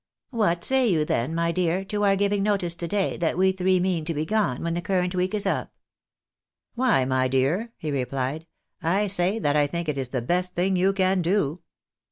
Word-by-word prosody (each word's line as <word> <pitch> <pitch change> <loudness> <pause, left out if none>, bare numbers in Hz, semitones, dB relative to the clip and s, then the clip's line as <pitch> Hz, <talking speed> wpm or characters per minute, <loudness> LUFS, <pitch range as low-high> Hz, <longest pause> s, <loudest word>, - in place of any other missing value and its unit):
"\Miat 175 -7 +1
say 265 -2 +3
you 160 -7 +2
then, 135 +3 -1
my 170 0 +1
dear, 180 +2 0
to 205 +1 -2
our 200 -1 +4
giving 200 0 +1
notice 195 -4 +1
to 170 0 -4
day 200 +1 -1
that 165 -1 -1
we 190 +1 +4
three 185 0 +1
mean 180 -3 0
to 165 0 -3
be 150 +2 -1
gone 200 - 0
when 170 0 -1
the 175 - -2
current 180 0 0
week 185 +3 -1
is 205 -1 -2
up? 195 - -2 0.3
" - - -68
" - - -63
Why, 240 - +2
my 130 0 +1
dear," 140 - 0
he 155 - -4
replied, 135 +3 -3 0.2
" - - -50 0.2
I 210 - +1
say 190 +1 +1
that 145 -9 0
I 145 -1 +3
think 170 +2 -4
it 145 -2 -1
is 130 -2 -3
the 125 -2 -3
best 180 +6 -1
thing 185 +2 +1
you 185 +2 +3
can 190 -1 +1
do." 170 -3 0
180 Hz, 230 wpm, -25 LUFS, 155-195 Hz, 0.3 s, our